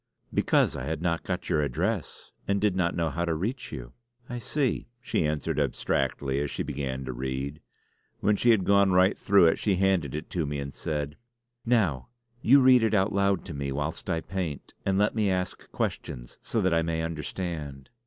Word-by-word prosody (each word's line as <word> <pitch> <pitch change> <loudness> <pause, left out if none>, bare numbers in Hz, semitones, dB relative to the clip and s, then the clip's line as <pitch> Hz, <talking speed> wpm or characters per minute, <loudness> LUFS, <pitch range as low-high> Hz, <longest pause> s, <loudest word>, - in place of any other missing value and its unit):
"Because - - +3
I - - -4
had - - -2
not 85 -2 +1
got 90 -1 -4
your 75 - +2
address, 70 -4 -2 0.2
and 100 0 +2
did 105 -2 +2
not 90 -2 +1
know 85 -2 0
how 85 +5 -2
to 85 -2 0
reach 120 - -3
you." - - -7 0.3
"I 120 - -5
see!" 135 +3 -1
she 105 -10 0
answered 75 -1 -1
abstractedly 70 -1 0
as 75 - -2
she - - -3
began 65 -2 -4
to 65 - -4
read. 65 +3 -4 0.6
When 105 - +3
she 120 - +2
had 110 -5 +5
gone 100 -1 +4
right 95 +2 +5
through 100 -3 +5
it 80 - +3
she 100 -3 +2
handed 90 -7 +1
it 75 - -6
to 85 -5 -1
me 75 0 -2
and 70 -1 -5
said: 75 -1 -3 0.5
"Now 95 - +2 0.3
you 135 +4 +6
read 130 -1 +7
it 110 -1 +2
out 100 +1 +2
loud 100 -1 +1
to 85 - -6
me 70 -1 -3
whilst 75 +6 -3
I 80 -2 0
paint; 90 -7 -4
and 95 0 +2
let 105 +1 +3
me 105 -3 +1
ask 90 -1 -3
questions - - -4
so 115 - -1
that 95 -3 +2
I 80 - +3
may 80 0 -1
understand." 80 -3 -5
85 Hz, 200 wpm, -27 LUFS, 75-100 Hz, 0.6 s, read